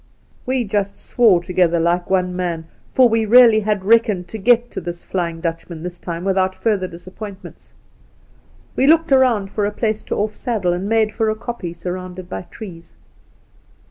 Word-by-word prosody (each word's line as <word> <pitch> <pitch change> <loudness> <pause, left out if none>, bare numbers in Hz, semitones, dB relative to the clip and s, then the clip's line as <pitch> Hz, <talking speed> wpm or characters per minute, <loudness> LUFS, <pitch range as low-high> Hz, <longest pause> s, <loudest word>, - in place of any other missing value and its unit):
' - - -35
We 255 -1 +1
just 200 -2 -2
swore 205 -8 +3
together 175 -1 +2
and 165 - +1
like 175 +1 0
one, 180 -1 +1
man, 170 -3 -3 0.3
for 255 -1 +5
we 225 -1 +1
really 230 0 +7
had 210 -2 -1
reckoned 210 -5 +3
to 220 - -6
get 240 +3 +3
to - - -5
this 175 0 -7
flying 170 -3 -3
Dutch 165 0 -4
man 165 -2 -8
this 180 0 -6
time 170 -1 -5
without 190 -1 +1
further 205 -5 0
disappointments. 185 +3 -11 1.0
We 270 - +2
looked 325 0 +4
around 240 -7 +3
for 210 - -2
a - - -2
place 215 0 -1
to - - -3
off' 210 +1 -2
saddle, 210 -8 -1
and 185 +3 -3
made 220 -1 +2
for 220 0 0
a 215 - 0
koppie 215 -7 -6
surrounded 180 +1 -6
by 95 - -6
trees. 170 -6 -11
195 Hz, 185 wpm, -19 LUFS, 175-225 Hz, 1.0 s, really